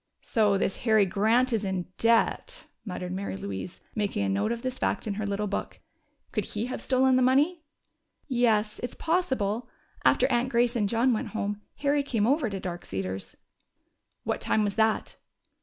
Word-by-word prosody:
"So 210 -3 +2
this 195 - 0
Harry 220 -3 +4
Grant 225 +7 +2
is 220 -2 +1
in 190 -2 -2
debt!" 230 - +2 0.2
muttered 180 -3 -5
Mary 190 - -3
Louise, 100 - -6
making 200 - -1
a - - 0
note 100 - 0
of 235 0 -3
this 255 0 -3
fact - - 0
in 210 - -1
her 210 +1 -3
little 200 +1 -1
book. 200 - -4 0.5
"Could - - -1
he 215 +2 -3
have 255 - -4
stolen 260 0 +3
the - - +3
money?" 290 +7 +3 0.7
"Yes, 225 -5 +2
it's 245 - -5
possible. 250 - 0 0.3
After 255 - +4
Aunt 245 +1 +2
Grace 240 -1 +2
and 210 -4 +1
John 235 +3 +3
went 215 - -2
home, 205 -1 -2 0.2
Harry 285 0 +3
came 230 -7 0
over 270 0 +2
to 195 -1 -4
Dark 175 -2 -5
Cedars." 95 0 -5 0.9
"What - - -2
time 215 - +2
was 205 -1 0
that?" 220 0 +1
220 Hz, 175 wpm, -28 LUFS, 200-250 Hz, 0.9 s, Harry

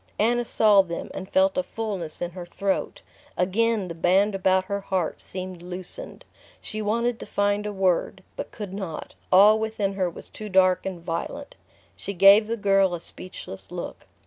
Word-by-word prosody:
Anna 240 +3 +2
saw 210 -3 +5
them, 170 -3 -6
and 190 0 -7
felt 285 0 +3
a - - +3
fullness 200 - -4
in 175 - -3
her 180 0 -7
throat. 195 +3 -2 0.3
Again 210 +2 +1
the 170 - -5
band 190 +5 +3
about 190 -1 +2
her 200 +1 -2
heart 190 -4 -2
seemed 185 -1 -6
loosened. 180 - -5 0.3
She 215 - -4
wanted 230 +3 0
to - - -8
find 205 +1 0
a - - -3
word, 190 0 0
but - - -5
could 205 -3 -7
not: 190 -6 -6 0.2
all 210 +4 +7
within 220 -3 -1
her 185 -2 0
was - - -10
too 215 -1 -8
dark 185 -1 +3
and 180 -3 -6
violent. 175 +12 -4 0.4
She 200 - -5
gave 200 +4 +7
the 230 +1 -2
girl 195 -3 +3
a - - -6
speechless 165 - -7
look. - - -7
195 Hz, 175 wpm, -25 LUFS, 185-215 Hz, 0.4 s, all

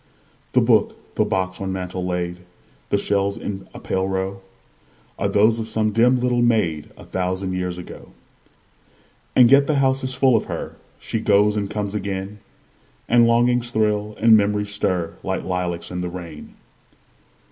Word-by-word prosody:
The - - +4
book, - - +1
the - - +1
box 95 0 -2
on 95 -1 -3
mantel 95 -1 -4
laid, 90 -1 -3 0.5
The - - +2
shells 100 0 +1
in 100 -1 -6
a - - -10
pale 95 0 -2
row, 95 0 -3 0.8
Are - - +1
those 110 +3 +3
of 110 - -4
some 110 -1 +1
dim 120 +4 +3
little 125 -1 +1
maid, 95 -11 +1
A - - -12
thousand 95 +1 -3
years 90 -1 -3
ago. 90 - -11 1.2
And 125 -1 +6
yet 140 0 +6
the 155 - +1
house 135 -1 +2
is 130 -1 +4
full 130 -2 +3
of 110 - 0
her; - - -6 0.2
She 115 - -2
goes 105 0 +3
and 100 -2 -2
comes 105 -1 -3
again; 100 0 -4 0.7
And 120 0 +5
longings 120 +1 +2
thrill, 105 -2 -1
and 115 0 +6
memories 105 0 +1
stir, 90 -4 -1
Like 95 -1 -3
lilacs 90 -2 -2
in 90 0 -4
the 90 - -3
rain. 85 -4 -10
100 Hz, 165 wpm, -21 LUFS, 95-115 Hz, 1.2 s, And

